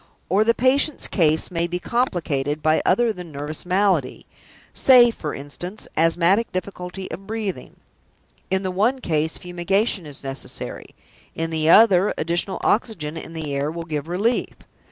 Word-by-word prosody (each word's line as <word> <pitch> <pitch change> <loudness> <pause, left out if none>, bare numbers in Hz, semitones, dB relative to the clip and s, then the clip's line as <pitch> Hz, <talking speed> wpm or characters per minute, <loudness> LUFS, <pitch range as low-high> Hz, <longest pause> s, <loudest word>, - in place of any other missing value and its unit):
Or 200 +4 +3
the 230 +1 +2
patient's 270 +4 +2
case 160 -1 +1
may 170 -1 0
be 175 +1 -3
complicated 160 - -1
by 155 0 +3
other 235 -2 +3
than 180 -4 -9
nervous 150 +4 -6
malady 185 -7 +1 0.5
say, 245 -3 +6
for 155 -9 -5
instance, 175 +8 -7
asthmatic 170 +7 +2
difficulty 185 0 -6
of 195 +1 -8
breathing. 210 - -5 0.7
In 190 +1 0
the 185 - -2
one 220 +8 +1
case, 160 -7 -1
fumigation 180 +1 -1
is 145 -2 -8
necessary; 135 0 -5 0.4
in 165 0 -2
the 160 0 +2
other, 200 -1 +6
additional 175 +4 -1
oxygen 170 -9 0
in 165 0 -6
the 155 -3 -4
air 140 +1 -1
will 165 +1 -6
give 155 -2 -4
relief. 205 +8 0
175 Hz, 150 wpm, -22 LUFS, 155-205 Hz, 0.7 s, say